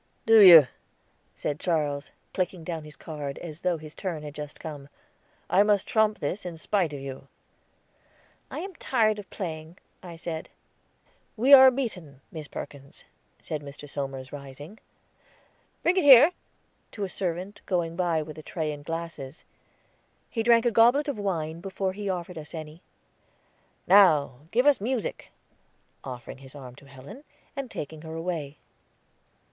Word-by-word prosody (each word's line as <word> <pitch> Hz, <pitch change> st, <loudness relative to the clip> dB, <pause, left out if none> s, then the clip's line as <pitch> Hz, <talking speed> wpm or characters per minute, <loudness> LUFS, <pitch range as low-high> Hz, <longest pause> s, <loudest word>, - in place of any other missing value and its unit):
"Do 225 Hz, 0 st, +7 dB
you?" 170 Hz, -7 st, +11 dB, 0.7 s
said 145 Hz, 0 st, -3 dB
Charles, 150 Hz, -4 st, -1 dB, 0.2 s
clicking 180 Hz, -2 st, -2 dB
down 160 Hz, -2 st, -5 dB
his 150 Hz, 0 st, -10 dB
card, 145 Hz, -2 st, -6 dB
as 160 Hz, -2 st, -8 dB
though 180 Hz, -2 st, 0 dB
his 155 Hz, -1 st, -11 dB
turn 170 Hz, -6 st, -5 dB
had 150 Hz, -1 st, -7 dB
just 150 Hz, 0 st, -8 dB
come. 145 Hz, -3 st, -8 dB, 0.6 s
"I 195 Hz, -, +4 dB
must 205 Hz, -1 st, +3 dB
trump 215 Hz, -1 st, +2 dB
this 160 Hz, +8 st, -3 dB
in 175 Hz, -2 st, -6 dB
spite 180 Hz, -1 st, 0 dB
of 145 Hz, -, -6 dB
you." 135 Hz, 0 st, -8 dB, 1.2 s
"I -, -, -5 dB
am 385 Hz, +1 st, -7 dB
tired 215 Hz, -4 st, +1 dB
of 200 Hz, -, -10 dB
playing," 160 Hz, -2 st, -6 dB, 0.2 s
I 175 Hz, -2 st, -9 dB
said. 165 Hz, -1 st, -6 dB, 0.9 s
"We 260 Hz, +6 st, +5 dB
are 265 Hz, -1 st, +11 dB
beaten, 185 Hz, -, -5 dB
Miss 155 Hz, -3 st, -7 dB
Perkins," 140 Hz, +2 st, -10 dB, 0.4 s
said 155 Hz, -3 st, -4 dB
Mr. 145 Hz, 0 st, -9 dB
Somers, 135 Hz, -2 st, -5 dB
rising. 145 Hz, +7 st, -10 dB, 1.0 s
"Bring 360 Hz, +2 st, +2 dB
it 370 Hz, -, +3 dB
here," 285 Hz, +3 st, +9 dB, 0.6 s
to 205 Hz, -, -4 dB
a -, -, -1 dB
servant 185 Hz, +2 st, -4 dB
going 170 Hz, -3 st, -1 dB
by 170 Hz, -3 st, 0 dB
with 155 Hz, 0 st, -10 dB
a -, -, -8 dB
tray 155 Hz, -1 st, -3 dB
and 145 Hz, -1 st, -8 dB
glasses. 165 Hz, -3 st, -6 dB, 0.9 s
He 225 Hz, -, -1 dB
drank 230 Hz, +1 st, +4 dB
a 240 Hz, -, +3 dB
goblet 240 Hz, +7 st, +4 dB
of 270 Hz, -, -3 dB
wine, 165 Hz, -5 st, -3 dB
before 190 Hz, 0 st, -3 dB
he 205 Hz, 0 st, -4 dB
offered 180 Hz, -2 st, -4 dB
us 150 Hz, +2 st, -10 dB
any. 155 Hz, +1 st, -8 dB, 1.0 s
"Now 155 Hz, -8 st, +4 dB
give 245 Hz, +7 st, +2 dB
us 290 Hz, -7 st, +4 dB
music!" 240 Hz, 0 st, -3 dB, 0.7 s
offering 125 Hz, -1 st, -8 dB
his 135 Hz, +1 st, -14 dB
arm 130 Hz, -3 st, -10 dB
to 140 Hz, -, -16 dB
Helen, 135 Hz, -, -12 dB, 0.3 s
and 275 Hz, -3 st, -5 dB
taking 155 Hz, -3 st, -7 dB
her 160 Hz, 0 st, -8 dB
away. 165 Hz, -4 st, -4 dB
165 Hz, 155 wpm, -27 LUFS, 150-205 Hz, 1.2 s, you